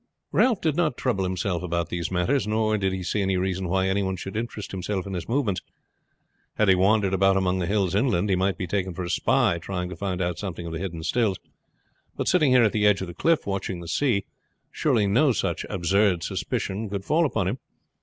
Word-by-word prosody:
Ralph 240 -6 +3
did 155 -3 +1
not 170 -2 +1
trouble 105 -8 0
himself 90 -1 -2
about 85 -2 -2
these 85 -1 -3
matters, 105 +8 0
nor 110 0 +1
did 95 -2 0
he 95 -1 -4
see 105 +3 -1
any 95 -1 +1
reason 95 0 -2
why 95 +1 +1
any 95 +1 +1
one 95 -1 -1
should 95 +2 -7
interest 110 -2 -4
himself 95 0 -3
in 100 - -6
his 90 0 -5
movements. 115 -7 0 0.9
Had 105 -2 +2
he - - +8
wandered 100 +1 +3
about 95 0 +3
among 95 -1 +1
the 90 - -1
hills 100 -3 +1
inland 105 -3 +2
he 95 - +2
might 95 -1 0
be 95 - -3
taken 95 0 -2
for 90 - -4
a 85 - -3
spy 110 -9 +2
trying 90 +1 -4
to 90 - -6
find 95 +1 -3
out 90 -1 -2
some 95 -4 -4
of 85 -1 -6
the 80 - -4
hidden 85 -4 -5
stills; 110 -1 +1 0.8
but - - -2
sitting 150 - +4
here 125 -1 +5
at 110 - +3
the 105 -1 +2
edge 105 -2 +3
of 95 - -3
the 85 - -7
cliff 165 - +1
watching 95 -2 -3
the 85 - -9
sea, 115 - +1 0.5
surely 125 -9 +1
no 125 +9 +3
such - - -2
absurd 95 0 +2
suspicion 100 +3 -3
could 100 -1 -4
fall 160 +4 +3
upon 110 - 0
him. 120 +7 -2
95 Hz, 225 wpm, -25 LUFS, 90-110 Hz, 0.9 s, he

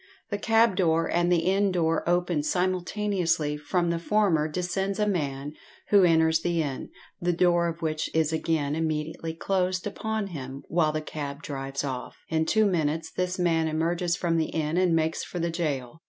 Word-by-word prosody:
The 205 - -1
cab 225 -1 +3
door 165 -3 +2
and 175 +1 +1
the 170 -2 +4
inn 195 +1 +2
door 165 -2 +1
open 175 -3 +1
simultaneously; 180 -2 0
from 170 +4 0
the 170 - -1
former 175 -5 +2
descends 180 +4 -2
a 210 - +2
man, 145 -7 -2 0.4
who 200 -1 +6
inters 160 -2 +4
the 170 0 0
inn, 135 -3 -5 0.3
the 175 +1 +2
door 175 0 +3
of 165 0 -5
which 155 -1 -1
is 160 -1 +1
again 160 -3 0
immediately 160 +1 -2
closed 185 +1 -1
upon 220 +1 -2
him, 135 -2 -7
while 160 -2 +2
the 155 0 -2
cab 145 -1 -6
drives 135 -1 -4
off. 130 -3 -5
In 160 0 0
two 220 0 +3
minutes 160 -4 0
this 180 0 -2
man 165 -3 +2
emerges 170 +2 0
from 170 -2 0
the 160 - 0
inn 155 0 -1
and 180 -2 +3
makes 160 0 0
for - - -7
the 170 0 -1
gaol. 150 -5 -3
165 Hz, 180 wpm, -27 LUFS, 155-180 Hz, 0.4 s, who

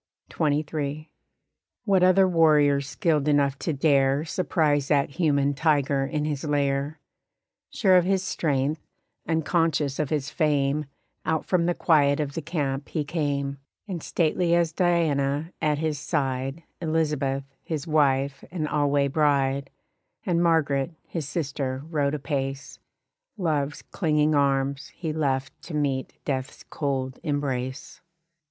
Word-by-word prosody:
XXIII. 150 0 -1 0.7
What 195 -3 +3
other 185 +1 +5
warrior 150 -5 +4
skilled 150 0 0
enough 140 -2 +2
to 165 - -1
dare 140 0 +2
Surprise 150 -5 +1
that 145 -2 +2
human 145 -3 +1
tiger 140 -2 +1
in 150 0 -2
his 145 -3 -3
lair? 145 0 0 0.7
Sure 190 -4 +3
of 180 - +4
his 190 0 +1
strength, 150 -3 -1 0.5
unconscious 160 -3 +1
of 150 -3 0
his 145 -2 -2
fame 150 -2 +1 0.4
Out 160 -1 -1
from 175 -2 +1
the 175 - +1
quiet 145 -4 +3
of 145 -2 -2
the 165 - -3
camp 145 -3 -3
he 155 - -1
came; 140 -3 -2 0.3
And 180 -5 -4
stately 170 +2 +1
as 170 -2 +2
Diana 160 -3 +1
at 150 -1 +1
his 155 -2 -1
side 135 0 -2 0.2
Elizabeth, 150 -4 0 0.2
his 155 -2 -4
wife 140 -3 +1
and 165 -4 -3
alway 145 -1 +2
bride, 140 -2 +1 0.6
And 170 -3 +1
Margaret, 160 -2 +1
his 155 -5 -5
sister, 140 -4 -3
rode 145 -2 +1
apace; 135 -2 -4 0.6
Love's 150 -6 -1
clinging 155 -3 +1
arms 140 -1 +1
he 160 -3 -3
left 135 -4 -2
to 170 - -7
meet 140 -3 -1
death's 130 -1 -3
cold 130 -3 -2
embrace. 135 -4 -3
145 Hz, 130 wpm, -25 LUFS, 140-160 Hz, 0.7 s, other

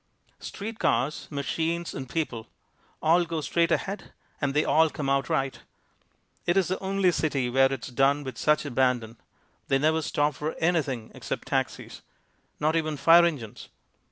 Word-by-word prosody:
Street 220 +2 -7
cars, 150 +4 0
machines 165 +4 -2
and 130 -2 -6
people 125 -9 -3 0.6
all 170 +3 +4
go 165 -1 -3
straight 170 +2 +1
ahead 195 +3 -2 0.3
and 140 -1 0
they 150 - +3
all 160 0 +4
come 140 -2 -3
out 140 0 +1
right. 135 -1 -1 0.9
It's 180 +1 +2
the 185 - -1
only 190 -1 +1
city 140 -7 -1
where 135 +1 +4
it's 135 -2 -4
done 140 +3 +2
with 130 -4 -7
such 150 0 +2
abandon. 125 -4 0 0.5
They 135 - +3
never 155 +3 +2
stop 150 0 0
for 150 +4 -4
anything 145 -9 -1
except - - -6
taxis - - -2 0.6
not 155 +2 +1
even 155 -2 -1
fire 165 +5 +7
engines. 135 -11 -4
150 Hz, 155 wpm, -27 LUFS, 135-165 Hz, 0.9 s, fire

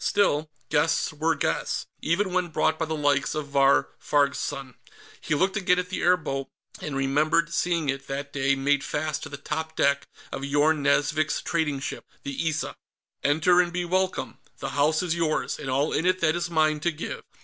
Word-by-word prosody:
Still, 155 -7 +2 0.2
guests 155 +1 +2
were 160 +2 +1
guests, - - -1 0.2
even 185 +3 0
when 180 -1 +1
brought 160 -1 +1
by 160 - +1
the 160 0 -3
likes 145 -2 +1
of 150 -2 -3
Vahr 140 0 +4
Farg's 140 -1 +2
son. 135 -2 -4 0.5
He 155 - 0
looked 190 +6 +1
again 180 -3 +2
at 180 0 -2
the 185 - -3
airboat, 155 -7 +1 0.3
and 150 -6 -5
remembered 150 +5 +2
seeing 170 -3 0
it, 135 0 -2
that 140 +1 -5
day, 140 0 +2
made 140 +1 +1
fast 155 0 -2
to - - -7
the 140 - -7
top 160 +3 -4
deck 140 0 +2 0.2
of 135 - -5
Yorn 145 +2 +2
Nazvik's 145 +2 +2
trading 155 -5 0
ship, - - -5 0.2
the 140 +4 -1
Issa. 155 0 -3 0.5
"Enter 160 +5 +4
and 175 -1 -2
be 175 0 -2
welcome; 185 +1 -1 0.2
the 135 - -4
house 150 +4 +2
is 175 -2 0
yours, 165 -2 -1
and 140 -3 -5
all 140 +4 +1
in 165 - +1
it 185 0 +2
that 165 -1 +2
is 175 0 -2
mine 155 -2 +2
to 170 - +1
give." 155 - -6
155 Hz, 195 wpm, -26 LUFS, 140-170 Hz, 0.5 s, Vahr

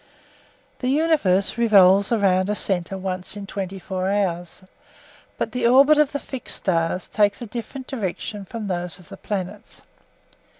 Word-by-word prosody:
The 250 - -1
universe 265 - +2
revolves 200 -3 +5
around 195 -4 +2
a 210 - 0
centre 190 -2 -1
once 185 +1 -4
in 200 - -6
twenty 195 -1 -5
four 185 0 -3
hours, 180 -3 -2 0.7
but - - -2
the 250 -2 +1
orbits 275 +5 +6
of 300 -1 +3
the 285 - -2
fixed 265 -3 -6
stars 170 0 -1
take 205 -1 +1
a 240 - -6
different 240 +4 -7
direction 210 -3 -4
from 220 +3 -6
those 180 -2 -2
of 180 - -18
the - - -10
planets. 190 -4 -6
200 Hz, 155 wpm, -23 LUFS, 185-235 Hz, 0.7 s, orbits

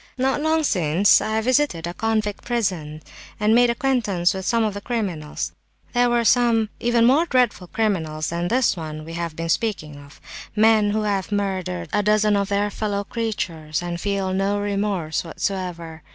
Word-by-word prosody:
Not 265 +2 +1
long 315 +1 +2
since 180 - +3
I 220 0 -1
visited 255 - +1
a 175 - -4
convict 215 0 -1
prison 180 -11 -2 0.4
and 210 +1 +3
made 245 +1 +5
acquaintance 235 -8 +1
with 190 0 -5
some 230 -1 +2
of 215 -2 0
the 205 - -6
criminals. 190 -11 -3 0.4
There 245 0 +3
were 240 -1 +1
some 230 -2 +3
even 235 -1 +3
more 290 +8 +4
dreadful 250 - +1
criminals 165 -8 -1
than 170 +1 -2
this 245 +3 +2
one 155 -2 -7
we 165 - -8
have 170 -2 -4
been 165 +1 -4
speaking 160 -8 -1
of—men 210 +9 0
who 215 +1 0
have 200 -2 -1
murdered 190 - -2
a 210 - +3
dozen 210 0 +3
of 200 -1 0
their 205 +1 0
fellow 205 -1 -2
creatures, 175 -8 -3
and 175 0 -4
feel 195 -2 -1
no 195 +2 0
remorse 200 -6 -1
whatever. 170 -2 -4
205 Hz, 165 wpm, -22 LUFS, 170-225 Hz, 0.4 s, made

